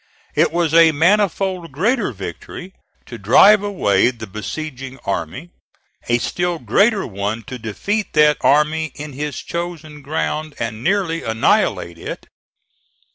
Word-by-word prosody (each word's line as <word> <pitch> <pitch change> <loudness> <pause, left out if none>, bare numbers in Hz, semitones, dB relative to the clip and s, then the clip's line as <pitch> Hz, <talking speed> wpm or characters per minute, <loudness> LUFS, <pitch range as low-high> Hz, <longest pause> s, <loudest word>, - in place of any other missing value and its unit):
It - - +2
was 170 -2 0
a 165 -1 +7
manifold 185 +1 +1
greater 205 - 0
victory 105 - -8 0.3
to 120 - -9
drive 195 - +6
away 120 - +2
the 115 -3 -7
besieging 130 +5 -6
army; 100 - -4 0.6
a 120 - +4
still 175 +7 -2
greater 195 - +2
one 105 +2 -4
to 125 +4 -8
defeat 200 - -3
that 150 -1 +4
army 150 +1 +2
in 150 -1 -8
his 145 0 -4
chosen 165 -3 -6
ground 155 +1 -3
and 115 0 -4
nearly 175 -3 0
annihilate 100 -6 0
it. - - -7
150 Hz, 130 wpm, -19 LUFS, 115-175 Hz, 0.6 s, a